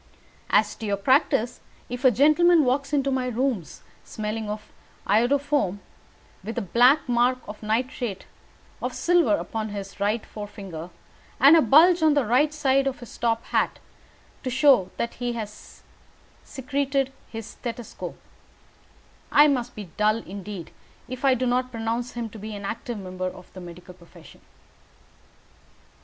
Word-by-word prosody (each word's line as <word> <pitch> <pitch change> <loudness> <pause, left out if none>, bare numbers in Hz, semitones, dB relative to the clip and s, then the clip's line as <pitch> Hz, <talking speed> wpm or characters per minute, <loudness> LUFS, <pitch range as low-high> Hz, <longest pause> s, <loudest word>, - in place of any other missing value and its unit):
As 210 0 +3
to 220 - -5
your 200 -1 0
practice, 260 +1 +2 0.3
if 245 +2 -6
a 260 - +8
gentleman 305 +6 +5
walks 275 +3 0
into 275 -2 +1
my 260 -1 0
rooms, 240 - -2 0.2
smelling 215 0 -4
of 210 0 -6 0.3
iodoform, 245 0 +2 0.7
with 225 +4 -6
a - - +1
black 245 - +4
mark 245 +1 +2
of 210 +1 -9
nitrate 230 -1 -2 0.6
of - - -3
silver 345 -3 +3
upon 220 -6 -4
his 200 -1 -7
right 210 +3 0
forefinger, 195 -5 -8 0.5
and 280 +5 +8
a 325 - +6
bulge 325 +8 +6
on 310 -2 +4
the 270 +2 +3
side 275 -2 +1
of 270 - -3
his 240 - -11
top 230 -1 0
hat - - +1 0.6
to 260 - -3
show 255 -7 +4
where 235 - -1
he 245 0 -4
has 215 -2 -9 0.6
secreted 275 0 -2 0.2
his 225 -1 -6
stethoscope, 235 +1 -7 1.1
I 295 +1 +7
must 250 -4 -1
be 205 -5 -8
dull 215 +1 +3
indeed 195 -1 -8 0.4
if 255 +1 -7
I 270 -2 +5
do 255 +1 -1
not 250 +1 +1
pronounce 230 +1 -3
him 240 -1 -4
to 220 - -10
be 215 +1 -6
an 200 -1 -7
active 230 +3 -4
member 185 -1 -5
of 180 - -10
the 185 - -9
medical 180 +1 -11
profession." 175 -1 -17
240 Hz, 145 wpm, -25 LUFS, 210-270 Hz, 1.1 s, a